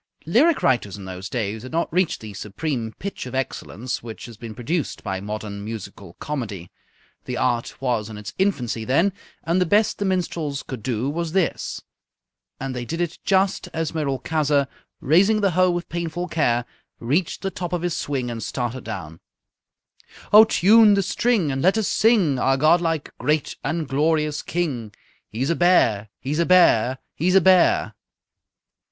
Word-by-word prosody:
Lyric 275 - +3
writers 115 -7 +1
in 100 - -9
those 95 +1 -7
days 110 -3 -3
had 130 - -9
not 165 -1 -1
reached 185 -1 +1
the 110 -2 -8
supreme 110 +4 -4
pitch 200 -8 -6
of 125 - -7
excellence 130 -2 -4
which 115 -1 -8
has 120 - -10
been 115 0 -9
produced 150 +6 -3
by 95 -2 -3
modern 105 0 -5
musical 100 -4 -8
comedy. 105 - -5 0.5
The 125 - -4
art 120 -2 -1
was 120 -5 -1
in 110 - -8
its 105 -1 -8
infancy 125 - 0
then, 165 - +2 0.3
and 170 +3 +1
the - - +3
best 210 +4 +2
the 205 - -1
minstrels 170 -6 -2
could 130 -4 -7
do 120 +1 -2
was 165 +2 -3
this 190 -3 -1 0.8
and 135 -1 -4
they 125 - -3
did 165 +7 -5
it 175 -1 -2
just 195 0 +1
as 165 -1 -1
Merolchazzar, 145 -1 0 0.3
raising 195 +9 +4
the 200 -2 +2
hoe 185 +2 +3
with 175 0 -2
painful 170 +1 -3
care, 120 -8 +1 0.3
reached 155 +13 -1
the 195 - -1
top 175 -2 -5
of 175 -1 -2
his 175 -2 -1
swing 130 -4 -2
and 115 -1 -5
started 120 +2 -3
down: 90 -7 -7 1.1
_"Oh, 215 +1 +10
tune 215 +1 +6
the 195 - +1
string 195 -4 +1
and 135 0 -2
let 190 +7 +3
us 220 - 0
sing 195 - +3
Our 135 +1 +2
godlike, 165 +1 +2
great, 150 +4 0
and 160 +1 -2
glorious 150 +1 +1
King! 130 -12 -3 0.3
He's 130 +8 -1
a - - +1
bear! 115 - +3
He's 145 +4 -3
a 170 - +3
bear! 130 -9 +5 0.2
He's 180 +4 +1
a 195 - +7
bear!" 190 - +4
145 Hz, 170 wpm, -23 LUFS, 115-175 Hz, 1.1 s, Oh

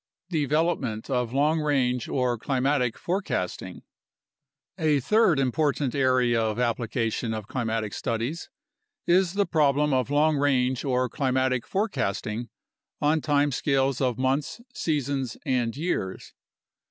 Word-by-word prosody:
Development 145 -7 0
of 125 -3 0
Long 150 +4 +2
Range 130 -5 0
or 125 -2 +1
Climatic 130 -1 0
Forecasting 175 - -3 1.0
A 155 -3 +3
third 200 - +3
important 135 0 0
area 130 -4 +2
of 110 0 -1
application 115 -1 -1
of 110 -2 -6
climatic 115 -4 -2
studies 115 +9 -3 0.6
is 180 0 +3
the 200 0 +2
problem 150 -3 +2
of 130 -1 +1
long 150 +1 +3
range 130 -3 +1
or 130 -2 +1
climatic 130 -2 0
forecasting 120 - -2 0.5
on 150 +2 +2
time 145 -1 +2
scales 135 0 0
of 125 -4 +1
months, 135 - -1
seasons, 140 - -2
and 125 -3 0
years. 145 - -3
135 Hz, 115 wpm, -26 LUFS, 120-150 Hz, 1.0 s, A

